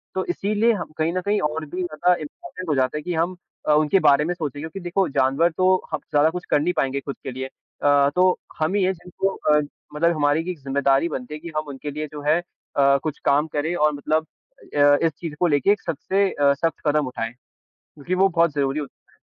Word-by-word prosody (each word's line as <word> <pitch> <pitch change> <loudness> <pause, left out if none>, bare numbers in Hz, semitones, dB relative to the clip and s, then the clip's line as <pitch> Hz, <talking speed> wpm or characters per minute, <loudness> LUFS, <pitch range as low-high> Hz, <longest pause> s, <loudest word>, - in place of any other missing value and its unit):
तो 190 - -1
इसीलिए 210 +5 +2
हम 180 -6 -5
कहीं 160 +2 0
न 185 - -1
कहीं 205 +1 +2
और 155 +1 -4
भी 180 +5 -5
ज़्यादा 175 +2 +2
इम्पोर्टेंट 175 +3 -8
हो 150 - +2
जाता 130 +2 +1
है - - -4
कि 180 - -3
हम 170 +3 0 0.3
अ, 150 - +5
उनके 155 +5 +4
बारे 140 +1 +4
में 175 - 0
सोचें, 145 -4 -5
क्योंकि 160 +5 -6
देखो, 180 +1 0
जानवर 140 +5 +2
तो 185 0 +4 0.2
हब - - -1
ज़्यादा 150 +2 +4
कुछ 180 +1 -6
कर 145 - +4
नहीं 180 +3 +1
पाएँगे 135 +1 0
खुद 140 0 -6
के 130 - -4
लिए। 130 +1 -5
अ, 145 +1 +1
तो 185 0 +5 0.3
हम 155 +4 +1
ही 200 - +2
हैं 190 +1 +2
जिनको 180 +2 -3
अ, 150 0 +3 0.4
मतलब 170 +2 +2
हमारी 145 +2 +2
ये 180 - -3
एक 165 - -9
जिम्मेदारी 140 +3 +2
बनती 130 0 -5
है 150 - -6
कि 170 +2 -8
हम 155 -1 -2
उनके 145 +1 -6
लिए 150 +1 -4
जो 150 -1 -7
है 155 +3 +4
अ, 140 -5 0
कुछ 155 -2 -3
काम 150 +3 +3
करें 160 +4 0
और 150 -2 +2
मतलब 155 +2 0 0.5
अ - - +1
अ, 145 0 +6
इस 165 - +3
चीज़ 165 -4 -5
को 175 - +3
लेके 160 +7 +3
सबसे 190 +5 0
अ, 140 -1 +3
सख्त 165 +4 -1
कदम 150 -2 +2
उठाएँ, 115 -2 -4 0.5
क्योंकि 155 +5 -6
वो 190 +1 +4
बहुत 170 -3 +2
ज़रूरी 140 +1 0
होता 145 - -11
है। - - -29
155 Hz, 235 wpm, -23 LUFS, 145-175 Hz, 0.5 s, अ